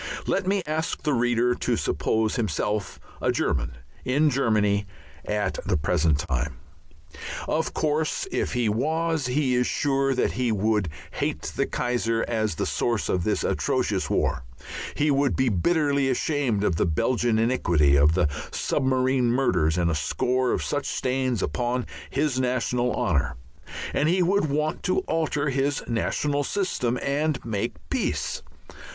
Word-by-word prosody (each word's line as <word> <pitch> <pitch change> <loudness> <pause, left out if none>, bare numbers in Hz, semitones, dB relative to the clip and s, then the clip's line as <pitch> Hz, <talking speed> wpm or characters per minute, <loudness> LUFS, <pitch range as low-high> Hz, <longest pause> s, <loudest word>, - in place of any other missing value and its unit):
Let 190 -1 0
me 195 -1 +1
ask 155 +1 -2
the 150 - +1
reader 120 0 +2
to - - -1
suppose 110 -1 0
himself 105 - -2 0.2
a - - +2
German 60 -3 -1 0.3
in 145 +4 +2
Germany 105 -6 +2 0.4
at 105 -2 -1
the - - +1
present 75 0 +2
time. 65 -1 -2 0.9
Of 160 +1 -1
course 155 - 0
if - - -1
he 120 -2 +1
was, 155 +6 0
he 130 0 +1
is 125 0 +2
sure 135 -1 +1
that 125 - +1
he 125 -2 0
would 105 -3 +1 0.2
hate - - -2
the - - +1
Kaiser 115 -2 0
as 110 -5 0
the - - -1
source 120 -4 -1
of 90 - +1
this 105 - 0
atrocious - - 0
war, - - 0 0.5
he 150 0 +2
would 140 -1 +2
be 130 -1 +2
bitterly 140 - +2
ashamed 130 -5 0
of 90 -6 +1
the - - +2
Belgian 115 +8 +1
iniquity, 85 - +3
of 75 +3 +5
the 90 -4 +3 0.2
submarine 130 -1 +1
murders, 90 -11 +2
and 85 -1 +2
a - - 0
score 125 - 0
of - - 0
such 145 -1 -2
stains 130 -4 0
upon 125 0 -1 0.2
his 135 -1 0
national 125 -1 0
honour; 70 -6 0 0.6
and 150 - +2
he 180 +1 +3
would 195 +1 +2
want 150 +3 -1
to 185 - +1
alter 150 -3 -1
his 135 +1 0
national 145 +5 0
system 135 -9 -1
and 145 +1 0
make 115 0 -2 0.2
peace. - - -1
125 Hz, 150 wpm, -25 LUFS, 105-145 Hz, 0.9 s, of